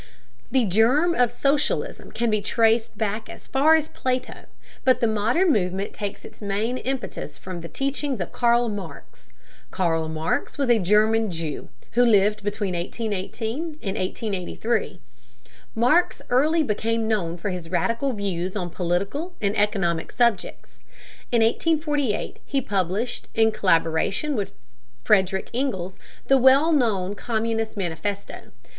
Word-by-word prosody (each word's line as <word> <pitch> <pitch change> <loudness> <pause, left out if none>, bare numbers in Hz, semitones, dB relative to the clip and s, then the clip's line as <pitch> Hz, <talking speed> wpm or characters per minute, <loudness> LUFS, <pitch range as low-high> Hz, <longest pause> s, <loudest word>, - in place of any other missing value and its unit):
The 260 -3 +2
germ 240 - +3
of 245 -6 +2
socialism 275 +4 -1
can 235 -1 0
be 215 -1 +1
traced 225 +2 +2
back 215 0 -2
as - - -10
far 295 +4 +4
as 310 -1 +1
Plato, 255 0 -3 0.4
but 255 -2 +4
the - - +2
modern 230 - +2
movement 190 -1 -1
takes 205 -1 -5
its - - -13
main 210 +5 -1
impetus 260 - -4
from 185 -2 -7
the 170 - -7
teachings 275 - -2
of 175 - -4
Karl 240 0 +3
Marx. 195 -9 -8 0.4
Karl 165 -3 0
Marx 160 - -2
was 275 -4 +2
a 230 - +5
German 215 +3 +3
Jew, 165 -4 -5 0.2
who 245 - +4
lived 210 -2 +4
between 205 -2 -2
1818 225 - -3
and 195 -2 -2
1883. 205 +2 -2 0.8
Marx 250 +10 +3
early 310 +6 +3
became 225 -1 -1
known 180 -6 -1
for 195 +3 -3
his 175 -3 -6
radical 230 +9 0
views 190 -3 -3
on 180 -4 -3
political 195 - -2
and 200 0 0
economic 195 -6 0
subjects. 235 -6 -1 0.5
In 235 -2 +4
1848, 295 -2 0
he 275 - -1
published, 200 0 -2
in 220 0 +4
collaboration 185 - +1
with 205 -4 -3 0.5
Frederick 190 0 +2
Engels, 195 -8 -2 0.3
the 270 0 +4
well 270 +6 +6
known 210 - +1
Communist 225 0 -2
Manifesto. 195 +2 -4
220 Hz, 135 wpm, -24 LUFS, 190-250 Hz, 0.8 s, well